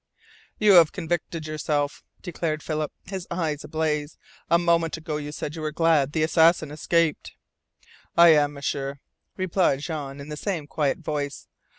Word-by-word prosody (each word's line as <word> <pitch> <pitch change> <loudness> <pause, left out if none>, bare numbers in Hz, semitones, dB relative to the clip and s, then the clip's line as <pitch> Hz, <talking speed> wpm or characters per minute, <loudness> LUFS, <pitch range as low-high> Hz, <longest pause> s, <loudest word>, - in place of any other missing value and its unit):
"You 210 -1 +5
have 170 -5 +7
convicted 165 -2 -3
yourself," 150 -2 -2 0.2
declared 160 -4 -3
Philip, 155 -1 -2
his 190 -1 -6
eyes 160 -4 -2
ablaze. 155 -1 -2 0.3
"A 170 - +5
moment 170 -1 +1
ago 155 -2 -4
you 150 0 -5
said 150 +1 -5
you 160 - -6
were 155 0 -2
glad 155 -3 +2
the 155 - +1
assassin 160 -1 +3
escaped!" 160 +1 0 0.8
"I 170 0 +9
am, 145 -2 +4
M'sieur," 140 0 -3 0.4
replied 185 -6 +1
Jean 145 -3 -5
in 140 +2 -9
the 150 - -5
same 170 -4 -3
quiet 145 0 -1
voice. 150 -4 -4
155 Hz, 155 wpm, -25 LUFS, 150-170 Hz, 0.8 s, I